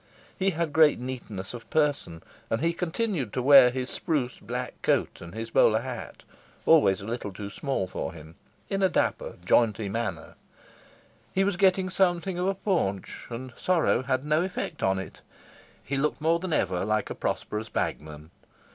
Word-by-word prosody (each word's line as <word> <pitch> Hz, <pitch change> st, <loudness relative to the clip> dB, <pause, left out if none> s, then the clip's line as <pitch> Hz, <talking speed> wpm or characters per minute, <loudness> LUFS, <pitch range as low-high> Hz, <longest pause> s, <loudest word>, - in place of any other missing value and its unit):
He 195 Hz, +1 st, +1 dB
had 165 Hz, -4 st, -2 dB
great 155 Hz, -1 st, +6 dB
neatness 120 Hz, -7 st, -6 dB
of 120 Hz, -2 st, -9 dB
person, 145 Hz, -, 0 dB, 0.3 s
and 115 Hz, -, 0 dB
he 165 Hz, +4 st, +1 dB
continued 170 Hz, -, -2 dB
to 125 Hz, -, -1 dB
wear 135 Hz, -2 st, +9 dB
his 125 Hz, 0 st, -3 dB
spruce 145 Hz, -8 st, -2 dB
black 125 Hz, +3 st, -5 dB
coat -, -, 0 dB
and 85 Hz, +3 st, -10 dB
his 115 Hz, 0 st, -5 dB
bowler 110 Hz, 0 st, +4 dB
hat, 125 Hz, -1 st, -7 dB, 0.4 s
always 120 Hz, -, +5 dB
a -, -, -8 dB
little 115 Hz, -2 st, -4 dB
too 100 Hz, +1 st, -7 dB
small 135 Hz, -7 st, -2 dB
for 95 Hz, -, -4 dB
him, 80 Hz, -1 st, -12 dB, 0.3 s
in 195 Hz, -1 st, -2 dB
a 190 Hz, -, +4 dB
dapper, -, -, -1 dB
jaunty 110 Hz, -3 st, +3 dB
manner. 105 Hz, -5 st, -4 dB, 1.0 s
He 190 Hz, -, +3 dB
was 200 Hz, -1 st, +1 dB
getting 185 Hz, 0 st, +3 dB
something 180 Hz, 0 st, +1 dB
of 180 Hz, -, 0 dB
a 195 Hz, -, +1 dB
paunch, 165 Hz, -, -2 dB
and 125 Hz, +1 st, -7 dB
sorrow 175 Hz, -8 st, +2 dB
had 130 Hz, +1 st, -1 dB
no 155 Hz, +2 st, +2 dB
effect 180 Hz, -3 st, -4 dB
on 95 Hz, 0 st, +2 dB
it. 95 Hz, -2 st, -7 dB, 0.6 s
He 140 Hz, -, -2 dB
looked 150 Hz, +2 st, 0 dB
more 165 Hz, +2 st, +2 dB
than 185 Hz, 0 st, -4 dB
ever 95 Hz, -, +1 dB
like 110 Hz, +2 st, 0 dB
a -, -, -1 dB
prosperous 110 Hz, +1 st, -3 dB
bagman. 75 Hz, +1 st, -4 dB
130 Hz, 175 wpm, -27 LUFS, 105-170 Hz, 1.0 s, wear